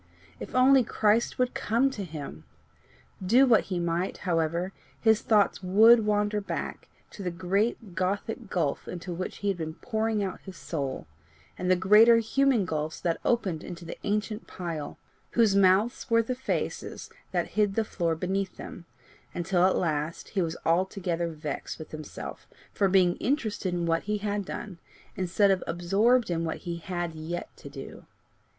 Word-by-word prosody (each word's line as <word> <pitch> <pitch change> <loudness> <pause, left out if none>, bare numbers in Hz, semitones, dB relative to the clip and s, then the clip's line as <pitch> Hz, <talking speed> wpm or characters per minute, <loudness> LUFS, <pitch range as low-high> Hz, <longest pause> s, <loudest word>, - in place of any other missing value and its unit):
If - - -8
only 260 +1 +6
Christ 220 +1 +1
would 250 0 +1
come 240 +5 +1
to 210 -6 -5
him! 145 - -8 0.8
Do 240 +9 +5
what 230 -5 +4
he 185 - -3
might, 170 +1 -1
however, 170 +2 0 0.3
his 220 -1 +4
thoughts 210 -3 +2
WOULD 215 +4 +6
wander 210 0 +1
back 200 - -5 0.2
to - - -9
the 185 - -2
great 190 +3 -1
gothic 200 +5 -2
gulf 160 -7 -1
into 180 0 -5
which 185 +2 -5
he - - +3
had 195 - -1
been 160 -1 -5
pouring 220 -1 -1
out 190 - -4
his 190 -3 -10
soul, 140 -5 -4 0.5
and 180 - -3
the 185 - +6
greater 210 +6 +6
human 240 -1 +2
gulfs 155 -2 -3
that 170 -2 0
opened 190 -10 0
into 175 -1 -8
the - - -6
ancient 210 +1 -2
pile, 165 -5 -5 0.4
whose 225 -4 +4
mouths 200 +7 +3
were 230 0 +4
the 255 - -2
faces 260 +1 -4 0.2
that - - -1
hid 205 -2 +1
the 225 - +2
floor 170 -5 -1
beneath 190 +3 -2
them 170 - -9 0.5
until 175 +1 +1
at 190 - +1
length 155 -1 -2
he 195 - 0
was 165 -1 -2
altogether 175 0 0
vexed 155 -3 -5
with 155 - -10
himself 155 -1 -8 0.3
for 200 - +2
being 180 -2 +4
interested 215 -8 -1
in 175 -1 -1
what 165 0 +1
he 210 +1 0
had 205 -1 -2
done, 185 -2 -7 0.4
instead 190 +2 +2
of 190 - +1
absorbed 195 +7 +2
in 165 -1 0
what 160 - -2
he 170 -1 -5
had 175 -1 -4
yet 160 +2 -6
to - - -11
do. - - -10
190 Hz, 170 wpm, -28 LUFS, 170-215 Hz, 0.8 s, only